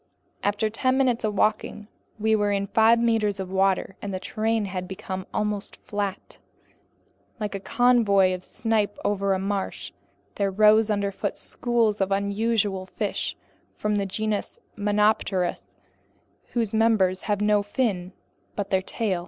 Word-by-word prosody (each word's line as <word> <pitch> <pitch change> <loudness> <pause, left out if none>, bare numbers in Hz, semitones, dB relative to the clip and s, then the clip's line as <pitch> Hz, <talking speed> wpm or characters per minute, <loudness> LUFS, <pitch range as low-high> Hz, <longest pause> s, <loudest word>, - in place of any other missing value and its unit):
After 205 +2 +1
ten 255 +4 +1
minutes 250 -3 +2
of 210 -1 -1
walking, 215 0 0 0.3
we 220 +1 +2
were 205 -1 +1
in 200 0 0
five 220 +3 +4
meters 225 -4 +1
of 190 -1 -5
water, 190 0 +1
and 200 - -4
the 185 - -3
terrain 220 +2 -1
had 185 -2 -4
become 190 0 -6
almost 210 -1 -2
flat. 205 -2 -5 1.0
Like 210 -2 -3
a 195 - -3
covey 205 -5 +3
of 180 0 -5
snipe 215 -2 -1
over 200 -1 +1
a - - 0
marsh, 195 0 -3 0.4
there 200 -1 0
rose 215 +2 +5
underfoot 200 -1 -1
schools 230 -4 0
of 195 0 0
unusual 200 -1 0
fish - - -3 0.4
from 210 0 0
the 200 -1 -1
genus 215 +1 -2 0.2
Monopterus, 205 -3 +1 0.9
whose 230 -4 0
members 215 -5 +3
have 205 -1 +1
no 210 0 +3
fin 205 -4 -1 0.4
but 200 -1 -3
their 190 -1 +3
tail. 195 -2 -2
205 Hz, 145 wpm, -25 LUFS, 195-220 Hz, 1.0 s, rose